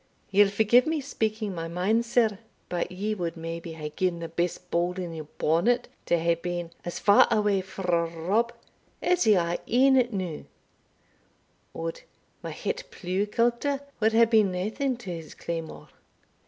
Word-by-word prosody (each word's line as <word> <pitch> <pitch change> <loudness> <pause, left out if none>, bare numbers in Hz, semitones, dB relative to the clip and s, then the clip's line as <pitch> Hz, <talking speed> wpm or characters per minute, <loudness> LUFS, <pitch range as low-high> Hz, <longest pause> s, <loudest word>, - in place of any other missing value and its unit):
"Ye'll 200 +1 +6
forgie 220 +4 +5
me 315 +4 -1
speaking 220 -6 -2
my 165 -1 -4
mind, 200 +8 +1
sir; 225 -4 +2 0.3
but 175 0 -2
ye 205 +4 -2
wad 175 -5 -3
maybe 165 0 -6
hae 155 -1 -5
gien 180 -2 0
the 170 0 -5
best 175 +2 -3
bowl 175 +1 +1
in 180 -2 -5
your 155 -2 -7
bonnet 230 +11 +2 0.2
to 170 - +3
hae 170 +1 +2
been 175 0 -4
as 175 - -5
far 205 0 +6
awae 205 -2 +2
frae 175 -3 -1
Rob 195 +9 0 0.5
as 360 -8 +2
ye 215 - +7
are 170 -1 0
e'en 260 0 +5
now 185 -7 -4 1.3
Od! 165 0 -4 0.4
my - - -5
het - - -4
pleugh 190 +3 -2
culter 240 +5 +1 0.2
wad 220 0 +3
hae 230 +1 +6
been 215 -4 +3
naething 220 +8 -1
to 210 -7 -7
his 165 -2 -8
claymore." 165 -2 -6
190 Hz, 160 wpm, -27 LUFS, 170-225 Hz, 1.3 s, ye